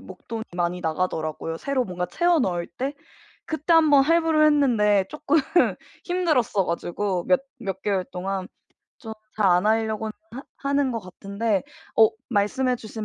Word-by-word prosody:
목돈이 220 +4 -8
많이 175 +1 -1
나가더라고요, 160 -1 -2
새로 265 +2 -1
뭔가 180 -1 -4
채워 345 -1 +2
넣을 175 -6 -1
때. 265 +10 -4 0.5
그때 315 +1 -1
한번 300 -4 +6
할부를 320 0 +3
했는데 225 -10 +3
쪼끔 300 0 0 0.7
힘들었어 300 - +1
가지고 175 +2 -2
몇 275 -1 +4 0.2
몇 195 -3 -4
개월 195 -3 0
동안 190 +1 -4 0.5
좀 220 -5 -8 0.2
잘 215 -2 +2
안 180 +3 +3
하려고는 220 0 0 0.2
하 265 +3 -7 0.3
하는 280 -2 +1
것 230 - -3
같은데 200 +2 -2 0.3
어 220 -1 +7 0.2
말씀해 250 +5 +1
주신 220 -1 -7
220 Hz, 300 characters per minute, -24 LUFS, 185-275 Hz, 0.7 s, 어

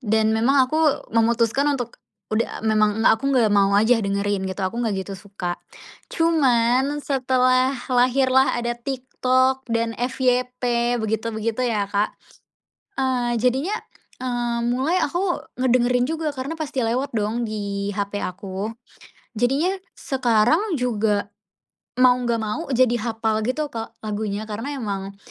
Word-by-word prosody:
Dan 220 -2 +2
memang 265 +5 +4
aku 310 0 +1
memutuskan 230 +5 +2
untuk 245 -2 -6 0.3
udah 215 +2 -1
memang 215 -1 +2
nggak - - +6
aku 250 - -10
nggak 240 -5 +4
mau 200 -1 +4
aja 220 +4 +4
dengerin 200 0 -1
gitu, 190 +1 -4
aku 190 +4 -2
nggak 220 -3 0
gitu 195 - -7
suka. 190 -3 -5 0.6
Cuman 275 -3 +2
setelah 255 -1 +2 0.2
lahirlah 255 +1 +3
ada 240 0 -2
TikTok 260 +1 0
dan 230 0 0
FYP 245 -1 0
begitu 220 +1 -2
begitu 225 +3 -2
ya, 210 -5 0
Kak, 205 +1 0 0.8
eee, 250 -3 0
jadinya, 260 - +1 0.4
eee, 240 -2 -2
mulai 260 +9 +1
aku 350 +4 -1 0.2
ngedengerin 250 0 +2
juga 320 -1 -2
karena 280 +4 -5
pasti 300 -4 -3
lewat 250 +4 0
dong 225 +2 -1
di 200 -2 -3
HP 200 0 -3
aku. 195 +3 -5 0.6
Jadinya 270 - +1 0.3
sekarang 255 - +2
juga 220 -4 0 0.7
mau 255 0 +6
nggak 235 -1 0
mau 215 +8 -2
jadi 250 -1 +3
hapal 225 -1 -1
gitu, 260 +6 -1
Kak, 225 -1 -6
lagunya, 210 -1 -3
karena 225 +7 -5
emang 200 -4 -4
240 Hz, 135 wpm, -22 LUFS, 215-260 Hz, 0.8 s, nggak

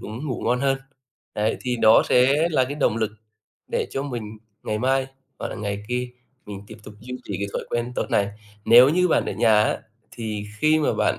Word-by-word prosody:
cũng 115 +8 -7
ngủ 130 - -3
ngon 125 +1 +1
hơn. 135 -1 +1 0.6
Đấy, 105 +1 0
thì 125 -1 -2
đó 110 -1 +6
sẽ 140 +6 +4
là 140 -5 +3
cái 140 +3 -5
động 125 -6 +1
lực 110 -2 0 0.6
để - - 0
cho 135 - -3
mình 115 -6 -6 0.2
ngày 105 0 -2
mai 130 +2 +1 0.3
hoặc - - -4
là - - -6
ngày 100 -1 -4
kia 125 0 -2 0.4
mình 100 -1 -8
tiếp - - -11
tục 105 - -11
duy 125 +3 -7
trì 100 - -4
cái 100 - -2
thói - - -3
quen 120 +1 -2
tốt - - -1
này. 100 0 +2 0.4
Nếu 120 +3 +8
như 180 +4 +2
bạn - - +2
ở - - -2
nhà 110 -2 +4
á, - - 0 0.3
thì 105 -3 -5
khi 155 +3 +4
mà 150 - +1
bạn - - +1
120 Hz, 220 wpm, -23 LUFS, 105-135 Hz, 0.6 s, Nếu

